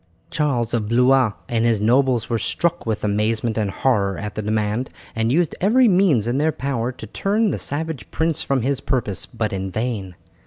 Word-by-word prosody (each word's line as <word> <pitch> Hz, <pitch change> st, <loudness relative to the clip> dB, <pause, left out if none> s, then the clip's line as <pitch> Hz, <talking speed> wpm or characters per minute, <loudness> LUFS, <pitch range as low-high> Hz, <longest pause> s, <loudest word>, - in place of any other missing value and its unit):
Charles 140 Hz, -8 st, 0 dB
of 110 Hz, -3 st, -1 dB
Blois 125 Hz, -1 st, +4 dB
and 115 Hz, -1 st, 0 dB
his 115 Hz, -2 st, +2 dB
nobles 125 Hz, +2 st, +2 dB
were 115 Hz, -2 st, -1 dB
struck 170 Hz, +6 st, -1 dB
with 110 Hz, -2 st, -2 dB
amazement 110 Hz, +2 st, 0 dB
and 105 Hz, -3 st, 0 dB
horror 100 Hz, -3 st, +1 dB
at 105 Hz, -1 st, -5 dB
the 110 Hz, -, -3 dB
demand, 110 Hz, +3 st, -1 dB, 0.3 s
and 115 Hz, +1 st, +1 dB
used 165 Hz, +2 st, +2 dB
every 240 Hz, +6 st, +5 dB
means 180 Hz, -, +3 dB
in 120 Hz, +3 st, 0 dB
their 155 Hz, +2 st, +2 dB
power 130 Hz, -4 st, -2 dB
to 125 Hz, -, -10 dB
turn 200 Hz, -, 0 dB
the -, -, -3 dB
savage 155 Hz, -1 st, -4 dB
prince 160 Hz, -1 st, 0 dB
from 135 Hz, -4 st, 0 dB
his 135 Hz, +1 st, 0 dB
purpose, 115 Hz, -9 st, -2 dB
but 110 Hz, -4 st, -3 dB
in 95 Hz, 0 st, -3 dB
vain. 105 Hz, -4 st, -3 dB
120 Hz, 190 wpm, -21 LUFS, 110-140 Hz, 0.3 s, every